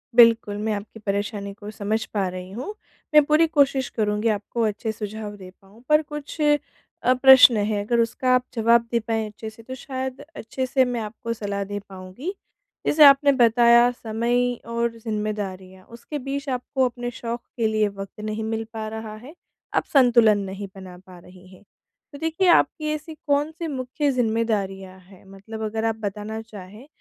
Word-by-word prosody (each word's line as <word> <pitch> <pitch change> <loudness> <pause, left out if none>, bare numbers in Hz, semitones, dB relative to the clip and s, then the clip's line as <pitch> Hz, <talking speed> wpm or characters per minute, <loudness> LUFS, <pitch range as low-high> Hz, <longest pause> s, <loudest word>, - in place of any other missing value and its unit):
बिल्कुल, 230 -3 +5
मैं 215 +1 -1
आपकी 210 +2 -7
परेशानी 200 0 -3
को 205 +1 -10
समझ 215 +2 -2
पा 195 -3 0
रही 185 +1 -8
हूँ। 260 - -6 0.4
मैं 300 -1 +8
पूरी 310 +2 +4
कोशिश 275 -4 +2
करूँगी 210 0 -1
आपको 210 +3 -2
अच्छे 220 +1 -3
सुझाव 210 -1 -6
दे 185 -1 -11
पाऊँ 200 +5 -20
पर 305 +1 +5
कुछ 295 +2 -7
अ, 290 -3 0
प्रश्न 260 -2 +8
हैं। 205 0 0
अगर 235 +1 +1
उसका 230 +2 0
आप 250 - +2
जवाब 230 0 +3
दे 235 - +2
पाएँ 225 -1 -2
अच्छे 215 +1 -8
से 220 +1 -16
तो 260 +2 -7
शायद 260 0 -5
अच्छे 260 +3 -4
से 260 0 +2
मैं 245 -2 -2
आपको 230 +2 -5
सलाह 200 -3 -3
दे 205 +1 -5
पाऊँगी। 190 - -7 0.5
जैसे 300 0 +5
आपने 280 0 +7
बताया 235 -1 +5
समय 240 +2 -1
और 235 0 -2
ज़िम्मेदारियाँ, 205 -4 -5
उसके 240 +6 -8
बीच 275 +2 -5
आपको 260 +1 -1
अपने 245 0 -4
शौक 235 0 -5 0.2
के 225 - +2
लिए 215 -1 +1
वक़्त 195 0 -9
नहीं 215 +1 -3
मिल 225 0 -2
पा 220 -1 -4
रहा 220 -1 -6
है, 250 +8 -12 0.4
आप - - +1
संतुलन 235 -6 +5
नहीं 195 +1 -6
बना 185 -2 -10
पा 185 -1 -13
रही 180 +1 -16
हैं। 185 +2 -17 0.5
तो 285 - -9
देखिए 325 +5 0
आपकी 310 -2 +3
ऐसी 305 +1 -6
कौन-सी 305 +4 0
मुख्य 275 +1 -2
ज़िम्मेदारियाँ 215 -6 -1
हैं 185 0 -19
मतलब 220 +3 -9
अगर 220 +1 -2
आप 225 -1 0
बताना 210 +2 -4
चाहें, 215 +3 -12
225 Hz, 175 wpm, -23 LUFS, 205-255 Hz, 0.5 s, मैं